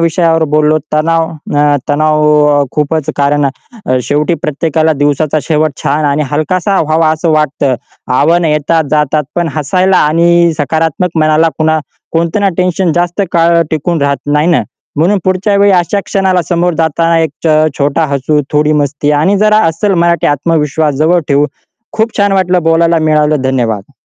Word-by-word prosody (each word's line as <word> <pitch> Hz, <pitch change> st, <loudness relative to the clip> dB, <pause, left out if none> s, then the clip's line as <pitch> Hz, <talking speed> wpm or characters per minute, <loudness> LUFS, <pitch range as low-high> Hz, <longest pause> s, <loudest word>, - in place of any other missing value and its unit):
विषयावर 165 Hz, 0 st, +1 dB
बोललो. 155 Hz, 0 st, +3 dB, 0.2 s
तणाव 165 Hz, +1 st, +1 dB, 0.3 s
अ, 145 Hz, 0 st, +3 dB
तणाव 150 Hz, -1 st, +2 dB
खूपच 150 Hz, 0 st, -1 dB
कारण 145 Hz, 0 st, +1 dB, 0.6 s
शेवटी 150 Hz, +6 st, 0 dB
प्रत्येकाला 155 Hz, +1 st, 0 dB
दिवसाचा 145 Hz, +1 st, 0 dB
शेवट 155 Hz, -1 st, 0 dB
छान 150 Hz, +2 st, 0 dB
आणि 145 Hz, +1 st, 0 dB
हलकासा 185 Hz, +6 st, 0 dB
व्हावा 160 Hz, +1 st, +1 dB
असं 160 Hz, +1 st, -1 dB
वाटतं. 145 Hz, -3 st, 0 dB, 0.4 s
आव्हान 165 Hz, +6 st, +2 dB
येतात, 155 Hz, +1 st, 0 dB
जातात 150 Hz, 0 st, 0 dB
पण 175 Hz, -1 st, -1 dB
हसायला 185 Hz, +5 st, +1 dB
आणि 170 Hz, +2 st, +2 dB
सकारात्मक 160 Hz, +4 st, -1 dB
मनाला 155 Hz, +1 st, +3 dB
कुणा 155 Hz, 0 st, +1 dB, 0.3 s
कोणतं 170 Hz, +4 st, 0 dB
ना 200 Hz, -, +2 dB
टेन्शन 180 Hz, -1 st, 0 dB
जास्त 175 Hz, +3 st, -1 dB
काळ 170 Hz, 0 st, +3 dB
टिकून 160 Hz, 0 st, -1 dB
राहत 140 Hz, 0 st, +1 dB, 0.2 s
नाही 150 Hz, +2 st, +2 dB
ना? 170 Hz, -, +2 dB, 0.3 s
म्हणून 185 Hz, +6 st, +2 dB
पुढच्या 190 Hz, +2 st, 0 dB
वेळी 200 Hz, 0 st, +4 dB
अशा 185 Hz, +2 st, +1 dB
क्षणाला 190 Hz, -2 st, 0 dB
समोर 175 Hz, -1 st, 0 dB
जाताना 165 Hz, +1 st, +1 dB
एक 160 Hz, -3 st, 0 dB, 0.2 s
अ, -, -, +3 dB, 0.2 s
छ 140 Hz, -, -14 dB
छोटा 145 Hz, +3 st, 0 dB
हसू 145 Hz, +2 st, 0 dB
थोडी 150 Hz, +1 st, +2 dB
मस्ती 145 Hz, +1 st, -2 dB
आणि 195 Hz, +5 st, +2 dB
जरा 215 Hz, 0 st, +3 dB
अस्सल 180 Hz, +5 st, 0 dB
मराठी 170 Hz, -1 st, +1 dB
आत्मविश्वास 150 Hz, 0 st, 0 dB
जवळ 170 Hz, +4 st, +2 dB
ठेऊ. 145 Hz, +1 st, +2 dB, 0.5 s
खूप 220 Hz, +1 st, -2 dB
छान 200 Hz, -1 st, +2 dB
वाटलं, 180 Hz, -2 st, +1 dB
बोलायला 165 Hz, +1 st, +2 dB
मिळालं, 150 Hz, -2 st, +1 dB
धन्यवाद. 120 Hz, -4 st, -2 dB
160 Hz, 155 wpm, -11 LUFS, 150-170 Hz, 0.6 s, वेळी